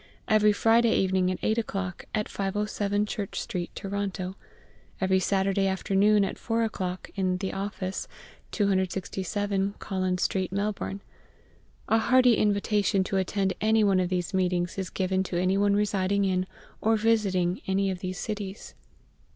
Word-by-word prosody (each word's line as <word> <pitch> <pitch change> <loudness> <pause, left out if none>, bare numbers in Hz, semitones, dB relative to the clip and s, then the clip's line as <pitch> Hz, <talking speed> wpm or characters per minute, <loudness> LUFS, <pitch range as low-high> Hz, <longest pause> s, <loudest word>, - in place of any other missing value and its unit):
Every 215 -1 +5
Friday 225 +2 +3
evening 185 -1 +2
at 185 - -1
8 220 +1 +2
o'clock, 195 -5 -4
at 210 -1 -1
507 205 +1 -1
Church 210 -2 -4
Street, 175 -1 -4
Toronto. 195 -2 -3 0.6
Every 190 -1 +2
Saturday 195 +1 +1
afternoon 200 +2 +3
at - - -5
4 230 0 0
o'clock, 185 -4 -4
in 185 -2 0
the 190 +1 -3
Office, 195 -1 -4 0.4
267 195 0 -1
Collins 185 -2 -1
Street, 185 -2 0
Melbourne. 200 0 -2 0.9
A 225 - +3
hearty 250 +1 +5
invitation 205 -1 +2
to 195 +1 -2
attend 190 0 0
any 220 +1 +4
one 195 -2 +3
of 180 -1 0
these 180 +1 -2
meetings 180 -1 0
is 190 - -3
given 190 0 0
to 180 -2 -2
any 185 +1 +2
one 200 0 +3
residing 200 -1 +1
in 185 -1 0 0.3
or 225 +1 +3
visiting 200 -5 +1
any 195 0 +1
of 185 - -5
these 185 0 -4
cities. 205 0 -5
195 Hz, 145 wpm, -27 LUFS, 185-210 Hz, 0.9 s, Every